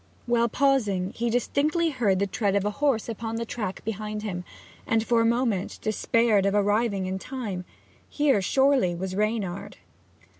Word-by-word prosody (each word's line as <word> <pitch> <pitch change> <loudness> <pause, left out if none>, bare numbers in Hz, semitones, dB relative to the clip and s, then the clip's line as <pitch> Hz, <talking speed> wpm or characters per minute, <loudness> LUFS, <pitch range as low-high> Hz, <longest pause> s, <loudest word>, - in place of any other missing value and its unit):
While 235 -1 +2
pausing 210 -8 +1
he 235 +1 -2
distinctly 305 +7 +1
heard 220 -8 +1
the 200 - +1
tread 200 0 0
of 200 0 +1
a 210 - +1
horse 270 -1 0
upon 225 0 -4
the 230 0 -2
track 210 -5 -5
behind 215 0 -4
him, 180 -4 -4 0.4
and 225 -1 +2
for 235 -1 +3
a - - +2
moment 230 -5 0
despaired 215 -1 +2
of 200 - +1
arriving 205 -1 +1
in 190 +1 -3
time: 205 -8 -5 0.4
here, 285 -8 +2
surely, 265 -4 +3
was 185 +2 -4
Reynard! 210 -3 -2
220 Hz, 160 wpm, -26 LUFS, 195-240 Hz, 0.4 s, for